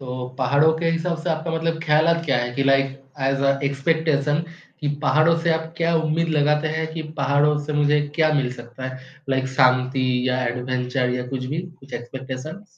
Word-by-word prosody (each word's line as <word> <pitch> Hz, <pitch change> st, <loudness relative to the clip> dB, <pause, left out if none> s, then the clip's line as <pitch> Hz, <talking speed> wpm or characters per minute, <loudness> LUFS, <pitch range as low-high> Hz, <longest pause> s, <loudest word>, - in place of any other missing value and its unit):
तो 125 Hz, -1 st, -5 dB
पहाड़ों 140 Hz, +5 st, +4 dB
के 165 Hz, 0 st, 0 dB
हिसाब 165 Hz, +1 st, -1 dB
से 180 Hz, -, -1 dB
आपका 160 Hz, +1 st, -1 dB
मतलब 165 Hz, 0 st, -1 dB
ख्यालात 165 Hz, +2 st, +3 dB
क्या 135 Hz, -5 st, +2 dB
हैं 120 Hz, 0 st, -2 dB
कि 135 Hz, -, +1 dB
लाइक 135 Hz, 0 st, +2 dB, 0.2 s
ऐज़ 135 Hz, +1 st, +1 dB
अ, 140 Hz, 0 st, +2 dB
एक्सपेक्टेशन 145 Hz, +1 st, +1 dB, 0.4 s
कि 145 Hz, -, -1 dB
पहाड़ों 155 Hz, +2 st, +4 dB
से 165 Hz, 0 st, +1 dB
आप 160 Hz, 0 st, -4 dB
क्या 170 Hz, 0 st, +1 dB
उम्मीद 160 Hz, +1 st, +1 dB
लगाते 150 Hz, +2 st, +2 dB
हैं 160 Hz, 0 st, -1 dB
कि 160 Hz, -, -3 dB, 0.2 s
पहाड़ों 145 Hz, +2 st, +3 dB
से 150 Hz, -, -3 dB
मुझे 150 Hz, +1 st, +3 dB, 0.2 s
क्या 155 Hz, -1 st, +3 dB
मिल 130 Hz, -4 st, +1 dB
सकता 120 Hz, +1 st, -9 dB
है, 130 Hz, 0 st, -7 dB, 0.3 s
लाइक 130 Hz, -1 st, +1 dB
शांति 130 Hz, 0 st, +3 dB, 0.2 s
या 125 Hz, 0 st, 0 dB
एडवेंचर 125 Hz, +1 st, -1 dB
या 125 Hz, 0 st, -4 dB
कुछ 130 Hz, -1 st, -4 dB
भी, 150 Hz, +6 st, -2 dB, 0.2 s
कुछ 135 Hz, -1 st, -15 dB
एक्सपेक्टेशन्स? 130 Hz, +8 st, -6 dB
140 Hz, 190 wpm, -22 LUFS, 130-160 Hz, 0.4 s, पहाड़ों